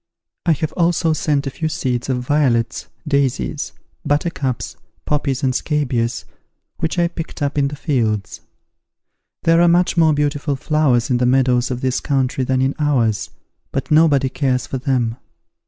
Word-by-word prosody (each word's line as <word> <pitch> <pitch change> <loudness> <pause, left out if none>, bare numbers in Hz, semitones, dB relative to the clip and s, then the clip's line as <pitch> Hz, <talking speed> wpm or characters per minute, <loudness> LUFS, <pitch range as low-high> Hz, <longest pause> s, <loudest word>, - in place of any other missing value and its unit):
I 165 - +6
have 155 +1 -3
also 170 -2 +2
sent 145 -2 0
a 135 - -3
few 160 +3 -2
seeds 130 -6 -2
of 125 -1 -1
violets, 125 -5 +1 0.2
daisies, 135 - 0 0.3
buttercups, 145 -4 -1 0.3
poppies 145 -3 -1
and 130 -1 +2
scabious, 130 -5 -1 0.5
which 160 - -2
I 170 -1 +3
picked 165 -2 -6
up 140 0 -1
in 140 -1 +2
the 145 - -5
fields. 110 - -1 1.0
There 165 +1 +4
are 175 - +5
much 175 +1 +3
more 160 -2 +4
beautiful 145 0 0
flowers 135 -3 +1
in 125 - +3
the 125 0 +2
meadows 125 -1 +3
of 125 -1 -3
this 130 -1 0
country 135 -1 0
than 130 0 +1
in 135 +1 +1
ours, 120 -8 +1 0.4
but - - -3
nobody 150 -4 +4
cares 130 -3 0
for 130 - -4
them. 125 -3 0
140 Hz, 155 wpm, -19 LUFS, 125-155 Hz, 1.0 s, I